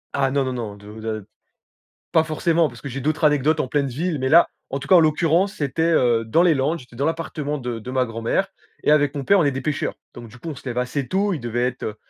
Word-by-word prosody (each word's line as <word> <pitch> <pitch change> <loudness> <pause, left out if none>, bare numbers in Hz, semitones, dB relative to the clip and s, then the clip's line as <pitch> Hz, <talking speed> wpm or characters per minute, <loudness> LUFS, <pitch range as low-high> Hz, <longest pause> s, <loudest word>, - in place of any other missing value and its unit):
Ah 135 -1 +2
non, 140 0 +1
non, 130 -1 -2
non, 110 -4 -5
de 105 +2 -11
de 110 -2 -4 0.9
pas 160 - +4
forcément, 165 +1 +1
parce 120 -2 -13
que 140 - -6
j'ai 135 +1 -5
d'autres 155 +3 -1
anecdotes 150 +1 +3
en - - 0
pleine 140 0 0
ville. 155 +4 -2
Mais 130 0 0
là 170 +2 +7 0.2
en 135 - -3
tout - - -8
cas 185 - +6
en - - +8
l'occurrence 165 +6 +2
c'était, 145 0 -2
heu, 125 -9 +3
dans 160 +10 +3
les 170 -3 +5
Landes, 145 +5 0
j'étais 125 -2 -15
dans 140 - -1
l'appartement 155 -2 -2
de 120 -3 -4
de 125 +4 -7
ma 130 -1 +1
grand-mère 115 0 -1 0.4
et - - +3
avec 145 -1 +3
mon 140 - -3
père 200 +8 +4
on 170 - +3
est 140 - +2
des 135 - -4
pêcheurs. 150 -1 -2 0.2
Donc 120 - -10
du 120 - -14
coup 160 +7 -7
on 150 - -5
se - - -13
lève 120 0 -4
assez 125 +2 -2
tôt, 195 +1 +1
il 155 - -3
devait 120 +1 -1
être, 125 0 -4
heu, 105 - -3
140 Hz, 275 wpm, -22 LUFS, 125-160 Hz, 0.9 s, en